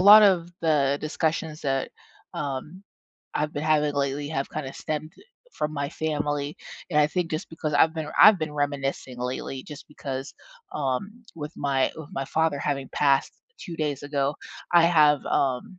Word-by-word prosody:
lot 205 +3 +10
of 185 -4 +4
the 145 -4 +2
discussions 155 0 -2
that, 135 -2 -1 0.4
um, 150 +6 -4 0.5
I've 150 +1 -1
been 145 - -3
having 150 -1 +2
lately 140 +1 -1
have 140 -3 -2
kinda 135 -3 -4
stemmed, 155 0 -4
eh, - - -16 0.3
from 150 0 -2
my 140 -1 -2
family, 145 -2 -2 0.3
and 150 - +2
I 150 - +5
think 170 +2 -2
just 155 +3 -3
because 155 -2 -3
I've 160 +2 +4
been 160 -2 -4
I've 210 -2 +9
been 155 -2 -3
reminiscing 140 -3 -2
lately 125 +1 -4
just 150 -1 -10
because, 135 -2 -6 0.4
um, 150 - -2
with 150 +1 -6
my 135 -2 +1
with 160 -2 -8
my 135 - -2
father 160 -1 +1
having 140 -2 -2
passed 140 -2 +2 0.3
2 170 - -7
days 145 -3 -2
ago, 140 0 -1 0.4
I 175 -1 +7
have, 150 -4 +5
um, 135 +7 0
150 Hz, 165 wpm, -26 LUFS, 140-160 Hz, 0.5 s, lot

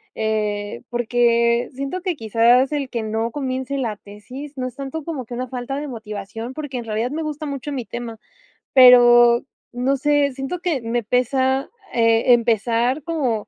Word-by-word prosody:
eh, 210 - -2
porque 235 0 +2
siento 275 +8 -4
que, 360 -3 -2
quizás, 235 +3 +3
el 280 -3 -2
que 230 -3 -3
no 225 +2 -2
comience 265 0 -3
la 225 -6 -2
tesis, 250 +9 -10
no 255 -1 -3
es 250 - -9
tanto 275 +3 -5
como 290 -6 -5
que 240 - -9
una 250 +1 -4
falta 250 +1 -4
de 295 -1 -5
motivación, 225 +1 -7
porque 290 -4 -5
en 235 - -5
realidad 225 +3 -2
me 320 +2 -3
gusta 305 0 -5
mucho 280 0 -5
mi 255 -3 -3
tema, 235 -1 -7 0.6
pero, 240 -2 +7 0.3
no 250 +3 0
sé, 285 0 +1
siento 270 +7 -4
que 335 -8 -1
me 235 +1 -1
pesa, 260 +3 +1 0.2
eh, 230 +1 +4
empezar 235 +3 +1
como, 270 -10 -2
245 Hz, 170 wpm, -21 LUFS, 230-275 Hz, 0.6 s, pero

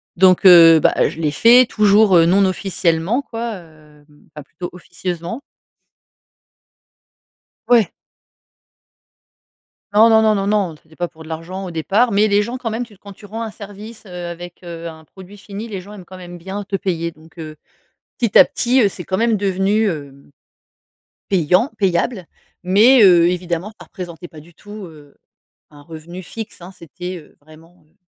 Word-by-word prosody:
Donc, 185 +1 +4
heu, 165 -3 +8
bah, - - +2
je 160 - -8
l'ai 150 -3 0
fait, 240 +9 +6
toujours, 210 -3 +3
heu, 165 - +5
non 195 +3 +3
officiellement 185 +3 -1
quoi, 230 -3 -6
hem, 155 -3 -19 0.3
enfin 150 - -9
plutôt 175 +5 -8
officieusement. 180 - -6 2.3
Ouais! 230 -7 +3 2.0
Non, 220 +2 +6
non, 220 -1 +5
non, 215 -1 +3
non, 195 0 -2
non, 200 -5 0
c'était 160 +1 -22
pas 175 - -3
pour 160 -1 -15
de - - -14
l'argent 180 +4 -6
au 175 - -7
départ, 205 +9 +1
mais 210 +1 +3
les 205 0 +2
gens 245 +3 -6
quand 235 - -4
même 230 +2 -3
tu 215 -3 -19
quand 200 - -12
tu 200 - -15
rends 220 +3 -7
un 225 - -4
service, 210 +2 -11
heu, 190 - -14 0.2
avec, 175 0 -9
heu, 170 -1 -8
un 160 -1 -11
produit 190 +4 -15
fini, 205 +2 -9
les 195 -4 -6
gens 205 +3 -13
aiment 190 -4 -12
quand 185 +1 -12
même 175 -1 -10
bien 190 +4 -6
te 195 - -4
payer 170 -4 -2
donc, 160 +1 -18
heu, 155 -1 -8 0.6
petit 235 -6 +3
à - - +8
petit, 255 +2 +1
heu, 210 - +4
c'est 180 -2 -9
quand 190 - -2
même 230 -1 +2
devenu, 200 +2 0
hem, 140 -3 -9 1.0
payant 185 - +2
payable. 190 +1 -1 0.4
Mais, 220 +7 +5
heu, 175 -3 +6
évidemment, 180 +2 -3
ça - - -12
représentait 175 -2 -9
pas 155 -2 -14
du 170 +3 -19
tout, 205 +1 -11
heu, 150 -3 -17 0.6
un 145 - -16
revenu 165 +3 -10
fixe, 220 +2 -9
hein. 180 +2 -10
C'était, 180 +2 -8
heu, 155 - -17
vraiment, 155 +2 -20
heu, - - -36
185 Hz, 175 wpm, -18 LUFS, 165-210 Hz, 2.3 s, heu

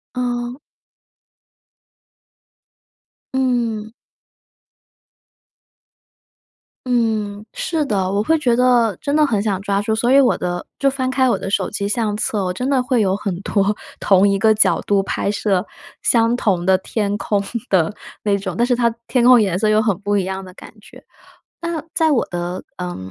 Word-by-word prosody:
嗯。 245 0 -2 2.8
嗯。 235 -4 0 2.9
嗯， 220 -4 -1
是 315 -4 -2
的。 195 -6 0
我 205 +1 0
会 320 +6 +2
觉 245 -5 +2
得 240 -4 +3
真 285 - -2
的 305 0 +4
很 220 -8 0
想 195 -3 -1
抓 200 0 0
住， 220 +2 -1
所 235 +3 +1
以 275 - +7
我 255 - +2
的 175 0 -3
就 275 - +3
翻 260 -1 -2
开 260 -1 +2
我 - - +2
的 195 - -5
手 - - 0
机 200 -1 -3
相 210 -1 -1
册， 210 -1 -1
我 180 - -2
真 250 +8 -3
的 270 -2 +2
会 250 -2 +1
有 190 -2 +1
很 195 -3 -3
多 200 0 0 0.2
同 195 0 +4
一 200 0 +1
个 220 +2 +4
角 215 - +3
度 200 -1 +1
拍 195 - -2
摄 200 -2 0 0.4
相 230 0 +3
同 190 -8 0
的 190 0 +4
天 205 +1 -2
空 205 -2 0 0.3
的 180 -1 +2 0.3
那 200 -1 +2
种， 190 -3 -5
但 240 - +3
是 245 0 +2
它 235 -1 +2 0.2
天 245 -2 +2
空 250 -2 +7
颜 190 -4 0
色 215 - +1
又 215 0 +4
很 205 -5 0
不 205 0 -1
一 195 - +1
样 190 0 -5
的 185 - -12
感 - - -13
觉。 - - -16 0.6
那 335 -2 -3
在 320 -1 +2
我 265 - +2
的， 175 +1 -4
呃， 180 0 -5
215 Hz, 180 characters per minute, -19 LUFS, 195-245 Hz, 2.9 s, 以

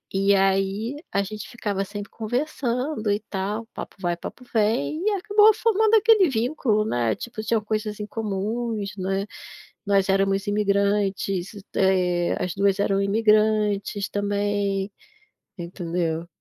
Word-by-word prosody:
E 195 +1 +4
aí 195 +6 +1 0.2
a 200 0 +1
gente 215 +2 -7
ficava 205 -5 -2
sempre 205 +1 -7
conversando 245 0 -2
e 205 - +1
tal, 205 +3 -2
papo - - -7
vai, 175 -2 -1
papo 250 +8 -9
vem 220 - +1
e 430 - +3
acabou 415 +2 +5
formando 440 0 +3
aquele 430 -5 +5
vínculo, 225 -3 0
né, 120 - 0
tipo, 235 -2 -7
tinham 220 0 0
coisas 215 0 -3
em 210 - -3
comuns, 215 0 -3
né, 195 +1 -1 0.6
nós 195 -1 +2
éramos 195 +1 +1
imigrantes, 200 -2 0 0.2
eh, 180 -2 +2
as 180 - -2
2 200 0 +2
eram 195 -1 +2
imigrantes 210 -1 +2
também, 205 -1 -1 0.7
entendeu? 170 -1 -3
205 Hz, 130 wpm, -24 LUFS, 195-225 Hz, 0.7 s, acabou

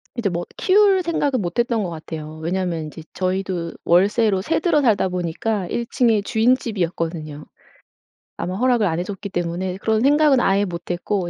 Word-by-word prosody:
이제 225 -5 0
뭐 175 0 -3
키울 390 -1 +4
생각은 285 -7 0
못 175 +4 -3
했던 235 -3 +1
것 180 - -3
같아요. 155 -1 -7
왜냐하면 170 -1 -2
이제 155 +1 -10
저희도 185 -2 -2
월세로 195 +3 +3
세 320 +11 0
들어 315 -3 +2
살다 210 -7 +2
보니까 180 +3 -2
1 235 - -2
층에 225 -4 +2
주인집이었거든요. 175 - -1 0.9
아마 180 +1 -3
허락을 245 -2 +2
안 165 0 -1
해 - - -1
줬기 200 +1 -6
때문에 180 +1 -3
그런 220 +1 0
생각은 290 -1 +4
아예 200 -2 +2
못 175 -1 -6
했고 175 0 -2
190 Hz, 355 characters per minute, -21 LUFS, 175-235 Hz, 0.9 s, 키울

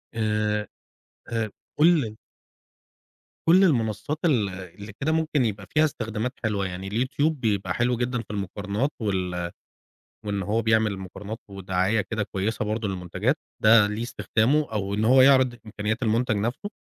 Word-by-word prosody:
آآ، 105 -1 0 0.7
آآ، 115 -1 0 0.3
كل 150 -9 +4 1.3
كل 185 +4 +7
المنصات 115 - +1
ال 120 - +2
اللي 95 +3 -9
كده 155 +3 +1
ممكن 155 -5 +1
يبقى 105 -2 -3
فيها 155 +1 +3
استخدامات 115 -3 -3
حلوة 105 -3 0
يعني، 95 +1 -6
الYouTube 130 +8 +1
بيبقى 100 -9 -1
حلو 120 0 +1
جدًا 125 0 -1
في - - -17
المقارنات، 100 +6 -2
وال 90 -4 -2 0.7
وإن 100 -1 -1
هو 110 +4 0
بيعمل 110 -2 +2
مقارنات 100 +4 -7
ودعاية 95 +2 0
كده 110 +1 -3
كويسة 105 +2 -2
برضو 110 0 -2
للمنتجات، 90 -2 -1 0.3
ده 110 -1 +7
ليه 105 +2 -3
استخدامه، 130 +5 +1
أو 100 -1 -2
إن 105 +2 0
هو 130 +2 +6
يعرض 130 -2 +5
إمكانيات 110 +2 -3
المنتج 115 0 +1
نفْسه، 120 - -2
110 Hz, 145 wpm, -25 LUFS, 100-125 Hz, 1.3 s, كل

